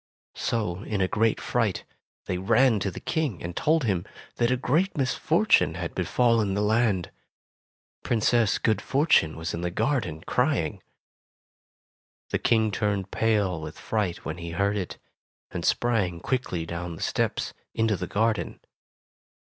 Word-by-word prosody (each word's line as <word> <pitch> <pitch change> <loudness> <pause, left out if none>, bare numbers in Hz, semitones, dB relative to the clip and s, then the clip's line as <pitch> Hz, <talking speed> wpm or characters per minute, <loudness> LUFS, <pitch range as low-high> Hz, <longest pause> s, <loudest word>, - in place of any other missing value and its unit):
So 105 -6 -2
in 105 -4 0
great 110 +4 +1
fright, - - 0 0.4
they 90 - -2
ran 115 +4 +4
to 100 - -1
the 90 - -7
King, 155 - -2
and 85 0 -5
told 155 0 +2
him 95 -7 0 0.3
that 120 -1 +2
a 125 - +2
great 160 +10 +1
misfortune 130 -2 +2
had - - -4
befallen 115 -5 +2
the 105 - +1
land 105 -4 +1 0.5
— - - -66
Princess 115 -1 +2
Good 110 -2 +1
Fortune 135 - +2
was 80 +2 -4
in 85 - -3
the 90 - -1
garden 105 - -1
crying. 125 - 0 1.5
The - - +1
King 110 -2 +2
turned 100 -2 -1
pale 100 -7 +1
with 75 0 -7
fright 105 -6 -2
when 80 +2 -4
he 85 0 -6
heard 100 +4 +1
it, 95 -4 -4 0.5
and - - -4
sprang 100 -8 +1
quickly 90 -7 -2
down 85 0 -5
the - - -6
steps, - - -1 0.2
into 110 -2 +2
the - - -4
garden. 110 +2 0
105 Hz, 150 wpm, -26 LUFS, 90-120 Hz, 1.5 s, ran